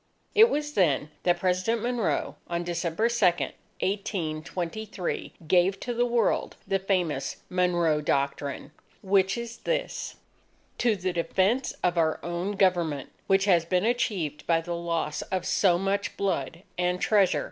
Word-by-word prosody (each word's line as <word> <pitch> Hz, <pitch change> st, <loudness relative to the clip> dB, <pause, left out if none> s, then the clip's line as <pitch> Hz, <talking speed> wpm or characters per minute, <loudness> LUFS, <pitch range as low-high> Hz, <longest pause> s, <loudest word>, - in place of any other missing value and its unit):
It 445 Hz, +2 st, +7 dB
was 295 Hz, 0 st, -2 dB
then, 155 Hz, -, +2 dB
that 175 Hz, -1 st, +2 dB
President 185 Hz, +5 st, +1 dB
Monroe, 240 Hz, -4 st, -1 dB
on 170 Hz, 0 st, -2 dB
December 170 Hz, +4 st, 0 dB
2, 235 Hz, -2 st, -1 dB, 0.6 s
1823, 185 Hz, +1 st, -3 dB
gave 180 Hz, +3 st, +3 dB
to 245 Hz, -, -3 dB
the 240 Hz, +1 st, +1 dB
World 235 Hz, -2 st, +1 dB
the 195 Hz, -, +1 dB
famous 180 Hz, -7 st, -1 dB
MONROE 175 Hz, -4 st, +2 dB
DOCTRINE, 140 Hz, 0 st, -1 dB, 0.3 s
which 195 Hz, +1 st, +3 dB
is 235 Hz, 0 st, -6 dB
this: -, -, -3 dB, 0.6 s
_To 225 Hz, -5 st, +2 dB
the 180 Hz, 0 st, -1 dB
defense 190 Hz, +9 st, +1 dB
of 175 Hz, -1 st, +2 dB
our 160 Hz, -1 st, +2 dB
own 175 Hz, +4 st, -2 dB
[Government], 175 Hz, -8 st, +1 dB, 0.2 s
which 195 Hz, 0 st, +3 dB
has 175 Hz, -5 st, +4 dB
been 180 Hz, +3 st, +1 dB
achieved 190 Hz, -, -1 dB
by 165 Hz, -1 st, +4 dB
the 170 Hz, +1 st, -4 dB
loss 165 Hz, -3 st, -2 dB
of 185 Hz, -2 st, -3 dB
so 180 Hz, -4 st, +3 dB
much 195 Hz, +2 st, -1 dB
blood 185 Hz, -2 st, -2 dB, 0.2 s
and 180 Hz, 0 st, +1 dB
treasure 195 Hz, -3 st, +3 dB
185 Hz, 140 wpm, -27 LUFS, 170-205 Hz, 0.6 s, It